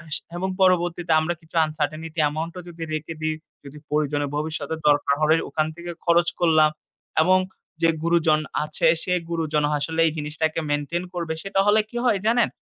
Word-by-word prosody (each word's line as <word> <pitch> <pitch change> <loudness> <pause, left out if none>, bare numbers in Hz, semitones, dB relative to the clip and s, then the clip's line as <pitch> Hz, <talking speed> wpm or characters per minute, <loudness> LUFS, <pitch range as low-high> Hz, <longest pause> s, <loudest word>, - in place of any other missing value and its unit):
স - - -1 0.2
এবং 190 +2 -1
পরবর্তীতে 175 -2 +2
আমরা 170 +2 -1
কিছু 160 +1 -19
uncertainty 155 +1 -3
এ্যামাউন্টও 160 +4 -2
যদি 165 -1 -7
রেখে 155 +1 -4
দিই, 155 0 0 0.3
যদি 140 +1 -11
প্রয়োজনে 145 -1 0
ভবিষ্যতে 155 0 -3
দরকার 145 -1 +3
হয় 155 +1 +4
ওখান 155 -1 0
থেকে 175 +1 -7
খরচ 170 0 +4
করলাম 160 -3 +5 0.5
এবং 185 +3 +5 0.4
যে 165 - +5
গুরুজন 165 -2 +3 0.2
আছে 150 - 0 0.2
সে 180 - 0 0.2
গুরুজন 155 -3 0 0.2
আসলে 160 +3 -3
এই - - +1
জিনিসটাকে 155 +2 -1
মেইনটেইন 145 +4 -1
করবে 170 -2 -2
সেটা 195 0 -1
হলে 210 +1 +5
কি 240 - -6
হয় 215 -5 +3
জানেন? 235 +1 +3
160 Hz, 165 wpm, -24 LUFS, 155-175 Hz, 0.5 s, করলাম